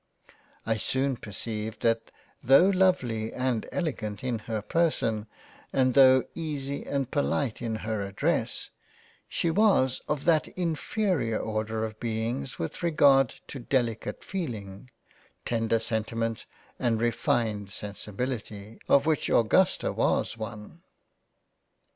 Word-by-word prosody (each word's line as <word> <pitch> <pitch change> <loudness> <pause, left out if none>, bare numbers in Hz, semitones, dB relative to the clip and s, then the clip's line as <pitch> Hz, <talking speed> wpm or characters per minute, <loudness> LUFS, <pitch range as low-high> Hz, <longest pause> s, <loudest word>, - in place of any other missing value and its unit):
I 110 -1 +1
soon 130 +5 0
perceived 110 0 -5
that 115 -1 +1 0.3
tho* 135 +10 +6
Lovely 130 - +1
and 125 -3 -1
Elegant 115 - -3
in 125 -3 -1
her 110 -2 -2
Person 115 -6 0 0.4
and 130 -1 +2
tho' 130 -1 +7
Easy 140 -4 -4
and 135 -2 -1
Polite 140 -5 0
in 115 -2 -2
her 110 -2 -1
Address, 100 0 -1 0.6
she 170 - 0
was 175 - +3
of 150 -2 -1
that 160 -2 +3
in 170 -3 0
ferior 160 - 0
order 110 0 -2
of 110 0 -8
Beings 115 +3 -3
with 80 - -5
regard 140 -6 +4
to 135 - -8
Delicate 120 -3 -1
Feeling, 115 - -5 0.6
tender 115 -1 +1
Sentiments, 115 0 -2 0.3
and 115 -3 +1
refined 115 -3 0
Sensibility, 105 +1 -5
of 140 +1 +5
which 155 -2 +1
Augusta 180 +12 +3
was - - +1
one. 110 +7 -8
120 Hz, 120 wpm, -28 LUFS, 110-140 Hz, 0.6 s, tho